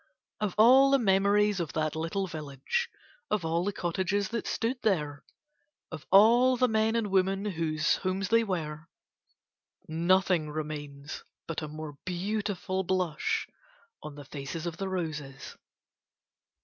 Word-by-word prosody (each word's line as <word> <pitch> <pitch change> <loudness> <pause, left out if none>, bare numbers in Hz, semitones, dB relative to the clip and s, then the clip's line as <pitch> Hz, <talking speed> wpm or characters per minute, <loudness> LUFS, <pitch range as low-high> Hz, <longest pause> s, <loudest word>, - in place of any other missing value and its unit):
Of 210 -4 -2
all 260 +5 +7
the 275 - +5
memories 205 -2 +3
of 170 -3 -3
that 155 0 -1
little 165 +5 -2
village, 155 - -3 0.4
of 210 -5 0
all 165 +2 0
the 205 - 0
cottages 190 +2 -1
that 230 0 -3
stood 245 +3 -2
there, 150 -9 0 0.7
of 155 -3 -8
all 240 +6 +6
the 255 +1 +3
men 220 0 +1
and 220 -4 -1
women 195 +1 +1
whose 160 -5 0
homes 190 +1 -2
they 230 0 +4
were, 160 -6 -4 1.0
nothing 170 0 +2
remains 150 -1 -6 0.2
but 165 0 -4
a 155 - -4
more 150 -1 -8
beautiful 190 0 -2
blush 180 -4 -1 0.5
on 150 -1 -8
the 145 -1 -10
faces 145 +4 -6
of 170 -1 -4
the 195 0 -3
roses. 155 -7 -5
185 Hz, 135 wpm, -29 LUFS, 155-205 Hz, 1.0 s, all